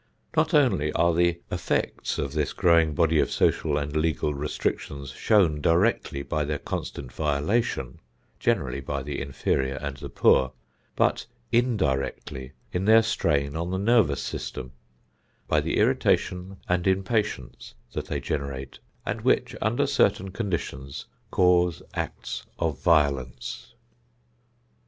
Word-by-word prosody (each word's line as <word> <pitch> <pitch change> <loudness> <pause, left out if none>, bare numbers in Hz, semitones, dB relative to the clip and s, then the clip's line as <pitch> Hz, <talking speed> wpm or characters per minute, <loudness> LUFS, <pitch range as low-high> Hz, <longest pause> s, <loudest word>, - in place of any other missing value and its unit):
Not 155 0 +3
only 95 - +3
are 85 0 +3
the 85 0 +2
effects 90 -2 -1
of 70 -1 -2
this 75 -2 -1
growing 85 -3 +3
body 80 -2 +3
of - - +2
social 75 -2 +1
and 75 0 -3
legal 75 -2 +1
restrictions 70 -1 -3
shown 85 -9 +3
directly 85 -4 +2
by 75 +1 -1
their 75 +1 -2
constant 65 -2 -5
violation, 75 - -1 0.4
generally - - 0
by 70 0 -3
the 75 0 -4
inferior 70 -1 -1
and 70 +1 -5
the - - -7
poor, 65 0 +3 0.4
but - - +1 0.2
indirectly 70 - 0 0.2
in 90 +2 -1
their 110 +1 +7
strain 70 -8 0
on 85 +2 -2
the 95 - -1
nervous 100 - +3
system; 65 0 -5 0.8
by - - +3
the - - -1
irritation 90 +2 +1
and 90 +1 +1
impatience 95 - -1 0.2
that - - -4
they - - -2
generate, 70 -3 -4 0.3
and - - -2
which, - - +1
under - - +1
certain 95 0 +2
conditions 85 - -4 0.2
cause 90 -2 +3
acts - - -5
of 80 -5 -1
violence. 70 - 0
75 Hz, 130 wpm, -26 LUFS, 70-90 Hz, 0.8 s, their